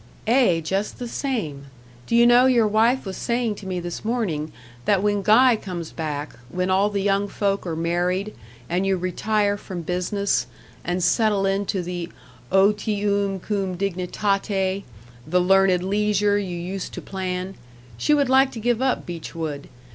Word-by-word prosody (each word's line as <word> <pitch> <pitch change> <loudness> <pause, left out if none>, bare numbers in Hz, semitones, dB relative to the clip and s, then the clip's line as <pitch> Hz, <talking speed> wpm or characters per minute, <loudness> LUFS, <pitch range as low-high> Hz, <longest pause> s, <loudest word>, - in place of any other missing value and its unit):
"Ay, 230 -9 +4
just 195 +5 -2
the 245 - -5
same. 215 - -3 0.4
Do - - 0
you 235 0 +6
know 240 +2 +6
your 240 -4 +4
wife 225 +5 +2
was 190 -1 -5
saying 235 -2 0
to 200 - -9
me 185 -1 -2
this 175 0 -6
morning, 200 -10 -2 0.3
that 200 -2 +2
when 205 -1 +1
Guy 230 +5 +5
comes 180 -6 -6
back, 150 -2 -4 0.2
when 180 +3 -1
all 195 +2 +3
the 200 -2 -2
young 200 0 +1
folk 200 -2 -1
are 165 - -2
married, 175 +5 -1 0.3
and 180 +2 0
you 190 -1 +2
retire 205 +3 0
from 185 -4 -7
business 180 -5 0 0.4
and 175 +1 -1
settle 210 -2 +2
into 195 -1 0
the 175 -1 -5 0.4
otium 200 0 +2
cum 195 -1 -2
dignitate, 195 +1 -1 0.4
the 180 +3 +2
learned 185 0 +4
leisure 205 +1 +1
you 180 -3 -4
used 180 +2 -5
to - - -6
plan 185 0 -4 0.4
she 295 - +2
would 285 -2 +2
like 265 +1 +4
to 230 - -6
give 240 +1 0
up 260 -1 0
Beechwood. 160 -4 -6
195 Hz, 160 wpm, -23 LUFS, 180-210 Hz, 0.4 s, you